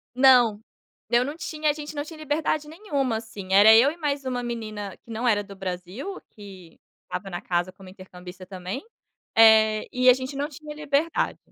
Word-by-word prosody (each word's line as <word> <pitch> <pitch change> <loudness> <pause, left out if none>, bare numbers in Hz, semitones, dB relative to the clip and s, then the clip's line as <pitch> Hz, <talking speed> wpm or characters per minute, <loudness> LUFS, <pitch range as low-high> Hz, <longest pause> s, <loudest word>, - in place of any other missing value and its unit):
Não, 245 -5 +5 0.5
eu 240 +2 +3
não 290 +4 -5
tinha, 310 -2 -2
a - - +2
gente 300 0 -8
não 290 -1 -3
tinha 320 0 -11
liberdade 305 0 -1
nenhuma, 290 - -2
assim, 210 -4 -8
era 210 +3 +8
eu 240 +6 +6
e 320 - -9
mais 290 -4 -2
uma 250 -1 -2
menina 215 -4 -5
que - - -19
não 225 +2 -3
era 210 -3 +3
do 200 -1 -12
Brasil, 190 - -6
que 190 -5 -14 0.3
estava 195 +1 -6
na 175 - -5
casa 175 +1 -2
como 190 0 -15
intercambista 185 -1 -12
também, 185 +6 -6 0.5
eh, 220 -1 +5
e 255 0 +5
a - - +9
gente 260 +2 -5
não 285 +1 -2
tinha 300 +1 -10
liberdade 300 +2 -1
235 Hz, 190 wpm, -25 LUFS, 200-290 Hz, 0.5 s, a